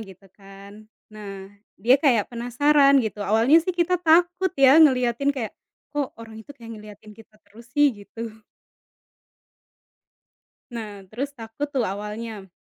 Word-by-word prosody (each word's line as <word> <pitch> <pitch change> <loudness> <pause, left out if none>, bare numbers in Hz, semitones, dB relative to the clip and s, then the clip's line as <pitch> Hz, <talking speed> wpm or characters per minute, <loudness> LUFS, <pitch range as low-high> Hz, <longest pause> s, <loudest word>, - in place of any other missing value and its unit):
gitu 195 -2 -13
kan. 200 +2 -15 0.2
Nah, 200 -2 -10 0.2
dia 245 +7 +3
kayak 245 -6 +1
penasaran 275 +4 +3
gitu, 210 -1 -5
awalnya 225 +10 +4
sih 340 - -11
kita 355 0 0
takut 350 +2 +3
ya 275 +3 +6
ngeliatin 255 -2 +3
kayak, 255 -6 -2 0.4
"Kok 290 -2 -3
orang 225 -1 -11
itu 285 +5 -14
kayak 230 -2 -11
ngeliatin 210 0 -14
kita 215 0 -19
terus 220 +3 -17
sih?" 290 +1 +3
gitu. 225 +2 -9 2.4
Nah 215 -4 -8
terus 275 +6 -5
takut 225 +3 -6
tuh 260 - +1
awalnya. 210 +1 -6
230 Hz, 135 wpm, -23 LUFS, 210-280 Hz, 2.4 s, ya